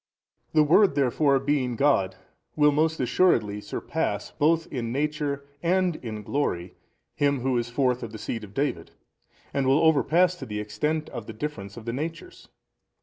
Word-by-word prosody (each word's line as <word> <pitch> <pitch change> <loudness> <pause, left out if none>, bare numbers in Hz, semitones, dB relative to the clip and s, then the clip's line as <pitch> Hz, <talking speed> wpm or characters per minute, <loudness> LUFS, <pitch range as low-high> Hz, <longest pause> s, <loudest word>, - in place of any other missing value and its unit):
A. - - -29
The 155 - +6
Word 175 +3 +5
therefore 140 +1 +3
being 135 -3 0
God 110 -8 +2 0.4
will 150 -1 +5
most 160 +2 +1
assuredly 115 - +2
surpass - - -3
both 160 +2 +2
in 115 -3 -3
Nature 145 0 -2 0.2
and 180 -1 +1
in 110 -3 -6
glory 95 -9 -2 0.4
him 140 -2 +1
who 130 0 0
is 120 0 -3
forth 125 0 +1
of 115 - -5
|271 - - -15
the - - -6
seed 115 0 -4
of 100 -1 -11
David 135 - -2 0.6
and 135 -1 0
will 140 +5 +4
overpass 165 +3 +4
to 135 - -8
the 105 -1 -4
extent 150 +10 -2
of 110 - -7
the 115 - -6
difference 110 -5 -6
of 115 - -9
the 115 - -3
natures. 165 - -6
140 Hz, 175 wpm, -26 LUFS, 115-155 Hz, 0.6 s, The